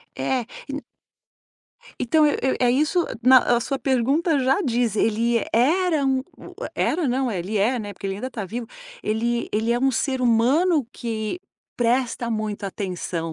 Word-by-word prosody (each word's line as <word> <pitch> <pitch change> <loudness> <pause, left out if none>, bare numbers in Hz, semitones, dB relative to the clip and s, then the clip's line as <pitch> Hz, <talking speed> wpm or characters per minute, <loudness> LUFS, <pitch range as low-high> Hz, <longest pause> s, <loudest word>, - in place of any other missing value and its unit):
É, 240 - 0 0.3
e - - -5
n 290 - -3 1.2
Então 305 +6 +3
eu 295 - +2
eu 265 - +1
é 245 -1 +4
isso 305 +7 +2 0.2
na 260 +2 +8 0.2
a - - 0
sua 270 +3 -2
pergunta 280 +5 +1
já 265 +5 +2
diz, 235 -4 0
ele 230 +1 +1
era 310 +5 +2
um 265 -1 +2 0.2
u - - -12 0.2
é - - 0
era 315 -4 0
não, 255 0 0
ele 195 +2 -3
é, 240 +6 +2
né, 205 -2 -5
porque 200 - -7
ele 195 - -2
ainda 215 +6 -4
está 220 -6 -5
vivo, 230 +5 -5 0.4
ele 235 +2 -1
ele 220 +2 +1
é 240 - +1
um 270 +1 +3
ser 260 +2 -1
humano 260 +6 +3
que 225 - -4 0.4
presta 240 0 0
muita 215 -2 -3
atenção 180 -4 -4
240 Hz, 175 wpm, -23 LUFS, 220-270 Hz, 1.2 s, na